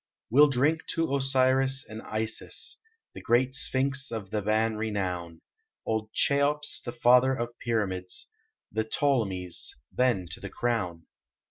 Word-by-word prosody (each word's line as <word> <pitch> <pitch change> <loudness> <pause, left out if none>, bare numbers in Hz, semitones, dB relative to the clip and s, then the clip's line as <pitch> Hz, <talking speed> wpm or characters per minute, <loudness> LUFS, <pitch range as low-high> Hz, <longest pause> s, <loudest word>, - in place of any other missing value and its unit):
We 135 +5 +6
ll 150 - +9
drink 145 +4 +1
to 165 -4 +1
Osiris 135 0 +2
and 110 0 -8
Isis 110 +1 -3 0.4
The - - -9
great 125 +2 +2
Sphinx 135 0 +1
of 110 -4 -5
Theban 110 +1 +1
renown, 90 -6 -3 0.4
Old 110 -1 -2
Cheops, 145 +1 +1
the 120 - -4
father 125 +2 +4
of 120 -1 -5
pyramids, 95 -6 -2 0.4
The 110 +1 0
Ptolemies, 105 -8 -1 0.2
then 120 -8 +1
to - - -5
the - - -7
crown. 90 -9 -2
120 Hz, 130 wpm, -28 LUFS, 105-135 Hz, 0.4 s, ll